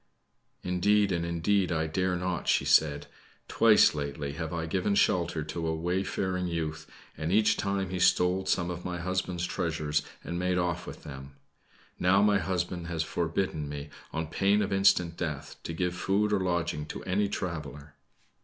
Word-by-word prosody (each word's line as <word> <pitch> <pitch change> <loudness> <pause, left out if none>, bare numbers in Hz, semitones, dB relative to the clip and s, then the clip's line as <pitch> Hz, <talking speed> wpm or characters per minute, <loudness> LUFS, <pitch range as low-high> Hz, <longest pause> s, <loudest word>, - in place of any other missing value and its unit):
"Indeed 100 +3 +2
and 85 -2 0
indeed, 85 +3 +1
I 80 -2 0
dare 90 +3 0
not," 90 -1 -3
she - - +3
said. 75 -2 +3 0.4
"Twice - - +5
lately 70 -1 -4
have 80 +2 -5
I 85 -1 -2
given 95 +4 0
shelter 85 -5 +2
to 80 +2 -4
a 80 - 0
wayfaring 90 +2 -1
youth, 80 -2 -4 0.3
and 80 +3 -3
each 105 +2 +4
time 100 -2 -2
he 90 - -2
stole 90 +1 +3
some 90 -2 +1
of 90 0 -6
my 90 -1 -3
husband's 90 -1 -2
treasures, 75 -3 -1 0.2
and 85 - -4
made 90 0 +1
off 90 -1 -1
with - - -9
them. 70 -1 -9 0.6
Now 95 +3 +4
my 105 -1 +4
husband 90 -1 -2
has 85 -2 -1
forbidden 80 -2 -2
me, 75 0 -6 0.2
on 80 0 -2
pain 100 +6 +2
of 95 - -2
instant 95 -3 +3
death, 75 -3 -4
to - - -5
give 90 +2 -1
food 100 +4 +1
or 100 - +3
lodging 85 -5 -1
to - - -7
any 100 +2 0
traveler." 75 -6 -5
85 Hz, 170 wpm, -29 LUFS, 80-95 Hz, 0.6 s, Twice